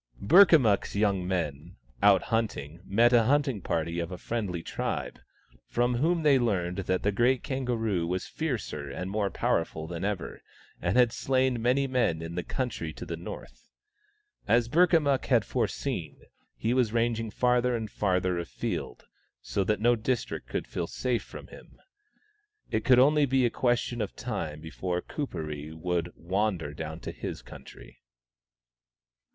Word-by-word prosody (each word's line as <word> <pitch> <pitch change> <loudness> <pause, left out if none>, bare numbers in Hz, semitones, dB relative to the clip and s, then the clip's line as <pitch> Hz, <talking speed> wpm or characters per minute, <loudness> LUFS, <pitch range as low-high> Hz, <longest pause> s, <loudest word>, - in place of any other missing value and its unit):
Burka 175 - +7
miikk's 110 -11 +2
young 100 -3 +1
men, 80 -7 -3 0.3
out 100 -2 +6
hunting, 90 -9 -2
met 115 +5 +4
a 115 -2 +5
hunting 140 -5 +2
party 85 0 -2
of 85 +1 -3
a 90 - -5
friendly 95 -5 -3
tribe, - - -3 0.5
from 120 +1 +1
whom 165 +5 +1
they 140 -3 +5
learned 90 -7 0
that 95 0 0
the 105 - +2
great 120 +5 +2
kangaroo 115 - -1
was 90 +1 -2
fiercer 110 - -4
and 90 +7 -5
more 105 -1 0
powerful 80 -4 -1
than 85 +1 -5
ever, 100 -3 -3 0.4
and 90 +5 0
had 120 -2 +5
slain 130 -2 +1
many 130 +4 +2
men 125 -11 +1
in 80 +1 -6
the 90 - -2
country 110 -7 -3
to - - -8
the 85 - -4
north. 85 +2 -10 0.8
As 120 0 +3
Burkamukk 160 -2 +3
had 120 -5 +3
foreseen, - - -2 0.4
he 115 +2 0
was 125 -4 +2
ranging 115 -1 0
farther 125 +2 +2
and 110 -2 -4
farther 90 -3 0
afield, 85 -6 -4 0.3
so 100 +10 -1
that 105 +1 +1
no 120 +2 +4
district 120 +1 -2
could - - -2
feel - - -4
safe 125 -2 -1
from - - -10
him. - - -15 0.9
It 110 - 0
could 130 - +6
be 125 - +6
only 140 -3 +3
a 120 - +1
question 120 -1 0
of 105 - -4
time 80 -11 -4
before 90 +2 -3
Kuperee 75 - -5
would 85 +1 -2
wander 90 -4 -1
dowT. 80 +2 -7
to - - -4
his - - -6
country. - - -13
110 Hz, 155 wpm, -28 LUFS, 90-125 Hz, 0.9 s, Burka